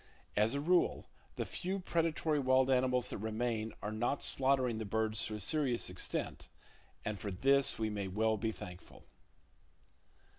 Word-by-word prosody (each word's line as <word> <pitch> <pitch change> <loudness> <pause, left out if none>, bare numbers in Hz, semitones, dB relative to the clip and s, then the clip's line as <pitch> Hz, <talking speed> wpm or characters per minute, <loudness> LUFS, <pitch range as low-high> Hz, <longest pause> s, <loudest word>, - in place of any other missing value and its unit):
As 110 +5 +3
a - - 0
rule, 175 +4 +2 0.3
the - - -2
few 190 +2 -3
predatory 165 -3 0
wild 130 0 +3
animals 125 -1 +2
that - - -4
remain 110 +1 -2
are 105 - -2
not 120 +6 -1
slaughtering 130 -4 +2
the - - -2
birds 110 +1 0
to 110 - -4
a - - -5
serious 125 - +1
extent; 90 - -3 0.6
and 105 -2 -3
for 105 - -4
this 135 +8 +3
we 110 -1 -1
may 100 -2 -3
well 110 +4 +1
be 110 +1 -1
thankful. 90 -4 -11
115 Hz, 155 wpm, -34 LUFS, 110-135 Hz, 0.6 s, As